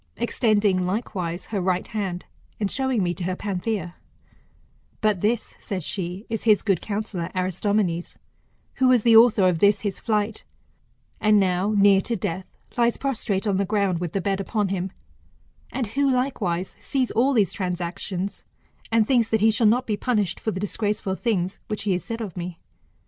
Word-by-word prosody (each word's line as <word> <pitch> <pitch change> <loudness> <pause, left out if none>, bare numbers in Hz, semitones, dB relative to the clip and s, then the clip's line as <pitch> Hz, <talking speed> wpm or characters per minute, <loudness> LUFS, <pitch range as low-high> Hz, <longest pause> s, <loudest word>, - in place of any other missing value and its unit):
Extending, 215 -5 +2
likewise, 185 -4 -3
her 200 - 0
right 180 0 0
hand, 195 -5 -4 0.3
and 205 -2 -1
showing 265 -6 0
me 175 -1 0
to 180 - -6
her 185 0 -1
Panthia; 190 -2 -3 1.0
But 210 -4 +1
this, 225 +2 0
said 190 -4 -4
she, 185 +4 -4
is 225 -2 -3
his 215 -3 +5
good 195 -6 +1
counsellor 200 -5 -3
Aristomenes, 185 -1 0 0.6
who 260 - +4
was 250 -4 +4
the 230 -2 +6
author 225 -4 +7
of 175 -3 +1
this 200 +2 +4
his 205 -3 -3
flight, 215 -1 -1 0.8
and 215 -1 +4
now, 190 +2 +1
near 200 -1 +6
to 235 - -2
death, 185 -1 -3 0.3
lies 235 -1 +2
prostrate 230 -7 -1
on 200 -3 +1
the 200 - +2
ground 200 -3 0
with 175 -2 -4
the 195 - 0
bed 195 +1 0
upon 205 0 -1
him, 190 -1 -2 0.8
and 255 - -1
who 275 +6 +1
likewise 210 -9 -1
sees 265 -3 -1
all 255 +5 +3
these 210 -7 +2
transactions, 185 +1 -3 0.5
and 225 -1 +3
thinks 240 -4 +3
that 220 -2 +1
he 220 +1 +5
shall 220 +1 +3
not 245 +4 +3
be 210 -2 -1
punished 210 -7 0
for - - -2
the 190 - -3
disgraceful 205 -1 -1
things 190 -3 -1
which 215 - -4
he 205 - 0
has 180 -1 0
said 230 0 -5
of 205 -6 -5
me. 175 -1 -5
205 Hz, 175 wpm, -24 LUFS, 185-225 Hz, 1.0 s, author